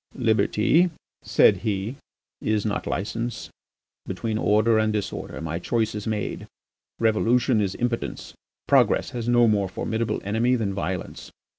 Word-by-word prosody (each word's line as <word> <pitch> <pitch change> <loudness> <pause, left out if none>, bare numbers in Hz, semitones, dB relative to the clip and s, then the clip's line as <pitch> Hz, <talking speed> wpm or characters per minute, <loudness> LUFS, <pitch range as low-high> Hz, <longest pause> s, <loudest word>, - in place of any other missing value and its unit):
"Liberty," 120 +7 +3 0.3
said 100 - +4
he, 105 +3 -2 0.5
"is 110 -1 0
not 105 - -2
licence. 115 +4 -3 0.6
Between 110 -1 -2
order 110 +2 +3
and 110 0 +2
disorder 105 -2 -4
my 80 +1 -3
choice 110 +4 0
is 105 +1 -5
made: 105 -2 -3 0.5
revolution 115 +1 +2
is 100 -2 -1
impotence. 120 -1 -3 0.3
Progress - - +3
has 120 -1 -3
no 120 -1 +5
more 100 -3 +2
formidable 110 +3 -2
enemy 115 +5 +1
than 105 -5 -1
violence. 95 -1 -4
110 Hz, 130 wpm, -24 LUFS, 105-115 Hz, 0.6 s, no